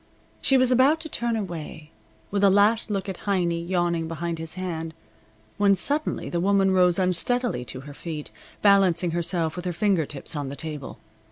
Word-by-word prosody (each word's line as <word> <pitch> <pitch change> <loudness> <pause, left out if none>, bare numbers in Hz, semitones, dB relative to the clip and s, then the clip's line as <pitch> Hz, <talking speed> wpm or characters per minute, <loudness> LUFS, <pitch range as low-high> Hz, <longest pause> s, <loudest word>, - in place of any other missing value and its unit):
She 270 - +4
was 255 -1 +3
about 265 +5 +4
to 315 - -6
turn 235 -4 -1
away, 165 -6 -6 0.4
with 200 0 0
a 200 - +7
last 210 +4 +3
look 200 -1 -2
at 190 -2 -7
Heiny 175 -3 +1
yawning 170 -2 0
behind 165 +1 -4
his 165 +1 -7
hand, 165 -3 -4 0.6
when 200 -1 +5
suddenly 290 - -2
the 170 - -2
woman 195 +1 +3
rose 180 -2 +4
unsteadily 190 - 0
to 130 +1 -5
her 145 +1 -10
feet, 155 0 -6 0.3
balancing 190 -4 +4
herself 170 -1 -1
with 180 0 -6
her 180 - -1
finger 185 -5 +1
tips 145 +2 -5
on 145 -2 -3
the 140 - -6
table. 150 -3 -6
180 Hz, 180 wpm, -25 LUFS, 165-200 Hz, 0.6 s, a